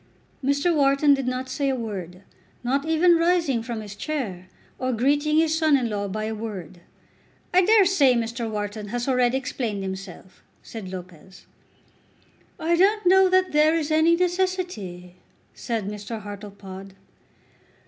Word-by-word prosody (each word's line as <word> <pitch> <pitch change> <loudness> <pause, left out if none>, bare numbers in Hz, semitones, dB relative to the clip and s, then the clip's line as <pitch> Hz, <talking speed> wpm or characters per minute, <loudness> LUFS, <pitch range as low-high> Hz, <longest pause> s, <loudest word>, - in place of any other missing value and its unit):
Mr. 285 +5 +1
Wharton 280 0 +4
did 270 -2 -1
not 255 +1 -2
say 275 +2 -1
a 265 - 0
word, 195 -6 -6 0.4
not 275 +5 0
even 335 +2 +4
rising 330 -8 +2
from 230 -1 -5
his 205 -1 -9
chair, 205 - -4 0.3
or 255 0 -1
greeting 290 +6 +1
his 320 0 +3
son 315 -3 +3
in 240 -4 -2
law 205 -1 -2
by 215 +2 -4
a 220 +1 -3
word. 200 -6 -7 0.7
"I 365 - +6
dare 420 +1 +5
say 290 -9 +4
Mr. 230 0 -2
Wharton 210 0 -4
has 240 +4 -3
already 250 -1 +2
explained 240 -6 -3
himself," 190 -1 -8 0.2
said 205 -5 -8
Lopez. 185 0 -11 1.1
"I 335 +2 +1
don't 410 +4 +3
know 380 +1 +6
that 370 0 +2
there 305 +2 +4
is 315 -2 -1
any 320 +2 +4
necessity," 350 - -2 0.4
said 225 -4 -3
Mr. 210 +2 -6
Hartlepod. 200 -2 -9
250 Hz, 150 wpm, -24 LUFS, 205-315 Hz, 1.1 s, I